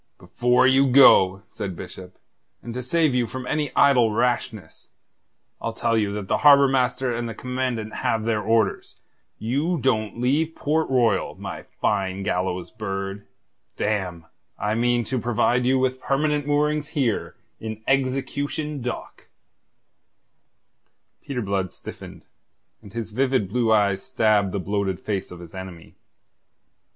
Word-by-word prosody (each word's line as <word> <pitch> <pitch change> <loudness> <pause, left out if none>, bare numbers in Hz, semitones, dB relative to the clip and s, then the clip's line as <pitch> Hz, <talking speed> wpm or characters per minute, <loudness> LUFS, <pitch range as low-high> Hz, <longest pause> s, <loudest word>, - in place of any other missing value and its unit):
"Before 125 +8 +2
you 135 +1 +5
go," 100 -8 +6
said 100 -4 -6
Bishop, 90 0 -10 0.5
"and 120 - -6
to 125 - -4
save 155 +3 +1
you 125 -2 +1
from 130 +1 -6
any 145 +1 -1
idle 125 -5 +5
rashness, 115 -2 -2 0.7
I'll - - -3
tell 115 - 0
you 105 -2 +1
that 105 -2 -5
the - - +1
Harbour 140 -1 +7
Master 130 -1 0
and 120 0 -3
the 115 - -6
Commandant 125 -4 -3
have 110 -1 0
their 110 -1 0
orders. 110 -1 0 0.4
You 145 +10 -1
don't 115 -4 0
leave 150 +6 +1
Port 155 +2 0
Royal, 120 -7 +1
my - - -7 0.2
fine 95 -1 0
gallows 90 -1 -2
bird. 100 -1 -5 0.5
Damme, 95 -6 -2 0.3
I 105 +1 -1
mean 120 +1 +1
to 130 +3 -2
provide 120 +1 +1
you 130 +1 +3
with 130 0 0
permanent 145 +1 0
moorings 150 0 +1
here, 125 -6 0 0.2
in 110 0 -7
Execution 135 +2 -1
Dock." 125 0 -6 1.9
Peter 125 -4 -4
Blood 95 -2 -1
stiffened, - - -11 0.6
and 100 - -13
his 115 0 -5
vivid 130 -2 +1
blue 115 +1 +1
eyes 100 -3 +3
stabbed 110 -6 +2
the 100 - -2
bloated 95 -1 -2
face 100 -2 -3
of 90 - -10
his 85 -2 -12
enemy. 95 -3 -9
115 Hz, 140 wpm, -23 LUFS, 100-130 Hz, 1.9 s, Harbour